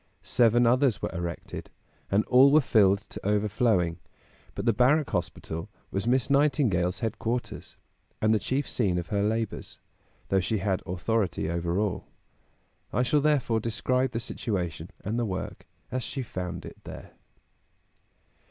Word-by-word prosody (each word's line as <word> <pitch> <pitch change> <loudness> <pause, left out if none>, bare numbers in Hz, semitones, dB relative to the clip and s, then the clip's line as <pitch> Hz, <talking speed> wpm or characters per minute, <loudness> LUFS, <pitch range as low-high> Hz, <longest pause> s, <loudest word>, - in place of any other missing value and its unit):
Seven 120 0 +4
others 125 -1 +3
were - - -3
erected, 85 -1 -5 0.4
and 100 +2 +2
all 130 +2 +6
were 155 - +7
filled 100 -7 +4
to - - -10
overflowing; 105 -4 +1 0.6
but - - -4
the 115 - +4
Barrack 135 +6 +3
Hospital 85 -3 -3 0.2
was 100 +3 -2
Miss 130 +1 +3
Nightingale's 125 - +2
headquarters, 115 +2 -3 0.4
and 110 +1 +3
the 110 - +3
chief 135 +6 -1
scene 95 -7 0
of 85 -2 -4
her 100 -1 0
labors, 110 +1 -2 0.5
though 95 - +3
she 110 +4 0
had 95 -1 0
authority 90 -2 -1
over 85 +1 -1
all; 105 -2 -1 0.8
I 125 - +1
shall 145 +4 +2
therefore 140 -6 +2
describe 125 +4 0
the 115 - -1
situation 90 -7 -3 0.2
and 110 +4 -1
the - - +1
work 95 -3 -5 0.2
as 130 0 -1
she 135 +2 -4
found 90 -6 -5
it - - -11
there. - - -10
110 Hz, 145 wpm, -27 LUFS, 95-125 Hz, 0.8 s, were